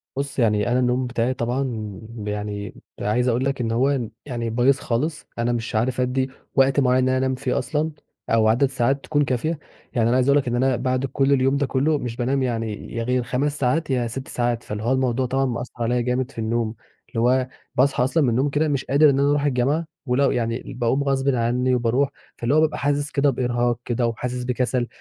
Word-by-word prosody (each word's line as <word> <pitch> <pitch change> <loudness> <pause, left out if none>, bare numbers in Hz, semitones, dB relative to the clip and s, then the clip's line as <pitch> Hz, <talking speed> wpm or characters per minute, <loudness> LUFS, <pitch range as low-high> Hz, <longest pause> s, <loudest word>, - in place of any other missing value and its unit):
بُصّ، 140 0 -3
يعني 105 -2 +2
أنا 125 - +3
النوم 125 0 +1
بتاعي 120 +1 0
طبعًا 120 -5 -3 0.3
يعني 105 0 -4 0.2
عايز 120 +5 +1
أقول 125 +1 +1
لك 135 -1 -1
إن 115 -1 -1
هو 135 +4 +2 0.3
يعني 120 -4 -3
بايظ 125 +4 +3
خالص، 150 +7 -2
أنا 120 +1 +1
مش 115 -1 -3
عارف 125 +3 +1
أدّي 130 +1 0 0.3
وقت 135 0 +4
معيّن 130 -1 +3
إن 130 - +2
أنا 130 - +2
أنام 130 0 0
فيه 130 -1 -1
أصلًا، 150 +5 -1 0.4
أو 110 -1 +4
عدد 115 +5 +4
ساعات 135 +1 0
تكون 145 -1 +1
كافية، 140 +5 -1 0.3
يعني 115 -2 +2
أنا 120 - +3
عايز 130 0 +2
أقول 140 - +6
لك 130 - -4
إن 120 - 0
أنا 130 +1 +2
بعد 130 +2 0
كُلّ 135 +1 +1
اليوم 135 +1 +2
ده 140 - +1
كُلّه 140 +4 +1
مش 120 -4 -4
بانام 130 +3 0
يعني 115 -4 -3
يا 115 - -1
غير 125 +1 0
5 140 +5 -1
ساعات 145 +5 +1
يا 125 -3 +1
6 130 +3 -6
ساعات 120 -1 -1
فاللي 105 0 -5
هو 120 - +1
الموضوع 130 -1 +1
طبعًا 135 +2 0
مأثّر 125 -1 -4
عليَّ 120 +1 +1
جامد 125 +1 -1
في - - -9
النوم، 115 0 -1 0.3
اللي 115 - -3
هو 130 +2 +3 0.3
باصحى 130 0 +3
أصلًا 145 +5 +2
من 130 - +3
النوم 130 +5 +1
كده 150 +3 +1
مش 140 -3 -1
قادر 145 +2 +5
إن 135 -1 +2
أنا 140 +1 +3
أرُوح 145 0 +2
الجامعة، 140 +4 +1 0.2
ولو 135 +2 +2
يعني 115 +2 -2
باقوم 125 +3 +1
غصبٍ 135 0 +1
عني 125 +2 +1
وباروح 125 +3 +1 0.3
فاللي 120 +5 +1
هو 155 - +5
بابقى 155 -1 +1
حاسس 145 0 0
كده 140 0 +3
بإرهاق 120 -2 0
كده، 120 0 0
وحاسس 125 +2 -3
بكَسَل، 125 0 0
125 Hz, 215 wpm, -23 LUFS, 120-135 Hz, 0.4 s, أقول